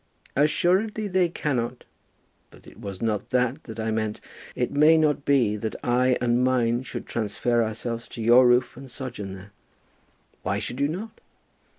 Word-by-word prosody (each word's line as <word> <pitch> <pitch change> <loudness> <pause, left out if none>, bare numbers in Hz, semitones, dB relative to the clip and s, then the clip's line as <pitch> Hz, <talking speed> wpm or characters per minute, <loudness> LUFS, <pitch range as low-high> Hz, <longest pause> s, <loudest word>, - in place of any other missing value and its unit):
"Assuredly 190 +9 +2
they 185 -2 +2
cannot. 125 -7 -2 0.7
But - - -19
it - - -15
was 100 +1 -7
not 105 -3 -1
that 125 +4 0
that 110 -1 -8
I 110 0 -1
meant. 110 -1 -2 0.4
It - - -1
may 155 +3 +5
not 150 -2 +1
be 125 -7 +3
that 110 +1 -4
I 125 +1 +2
and 120 0 +2
mine 120 -2 +2
should 130 - -7
transfer 115 +2 0
ourselves 115 +1 -4
to 115 - -8
your 120 +3 +7
roof 125 +1 +3
and 135 +1 -11
sojourn 120 -7 -6
there." 95 +2 -12 0.9
"Why 100 +2 -1
should 115 +5 -5
you 140 - +2
not?" 200 +9 -6
125 Hz, 165 wpm, -25 LUFS, 110-140 Hz, 0.9 s, your